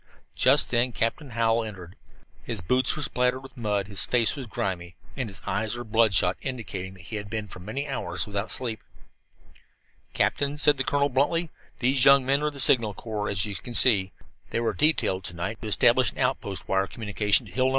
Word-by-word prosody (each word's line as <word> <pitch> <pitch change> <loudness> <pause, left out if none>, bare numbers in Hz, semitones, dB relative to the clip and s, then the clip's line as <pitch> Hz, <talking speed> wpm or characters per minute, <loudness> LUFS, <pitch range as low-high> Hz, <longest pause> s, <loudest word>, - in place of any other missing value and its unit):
Just 135 +4 +4
then 125 0 +2
Captain 125 +7 -1
Hallowell 115 0 +1
entered. 95 -4 -9 0.5
His 115 -4 -4
boots 125 +8 +2
were 150 - -1
spattered 125 0 +1
with 135 -1 -12
mud, 105 -4 -1
his 100 -2 -3
face 120 -1 +1
was 135 -4 -7
grimy, 90 -4 -4 0.2
and 125 -5 -3
his 95 - -9
eyes 110 +2 -2
were 120 - -5
bloodshot, 105 -5 +2
indicating 100 -8 -5
that 95 - -14
he 105 +5 -5
had 100 -1 -7
been 110 -1 -4
for 90 - -9
many 115 +10 -5
hours 90 - -1
without 100 +1 -3
sleep. 115 -4 0 1.3
"Captain," 145 +1 0
said 150 -1 +4
the 135 - 0
colonel 140 +1 +1
bluntly, 150 +5 0 0.3
"these 130 +1 +2
young 135 -1 +6
men 140 +2 +2
are 150 - 0
of 150 - -3
the 140 - -6
Signal 115 -6 +3
Corps, 105 -2 -4
as 95 -2 0
you 105 - -5
you 100 - -4
can 120 +5 -8
see. 100 -5 +4 0.4
They - - -2
were 115 -1 -1
detailed 145 -11 +1
to 90 - -7
night 95 +7 -5
to 110 - -6
establish 120 +4 +4
an - - -18
outpost 125 -7 -2
wire 95 0 +1
communication 105 -2 +1
to - - -13
Hill 130 0 0
No. - - +3
115 Hz, 210 wpm, -26 LUFS, 100-130 Hz, 1.3 s, young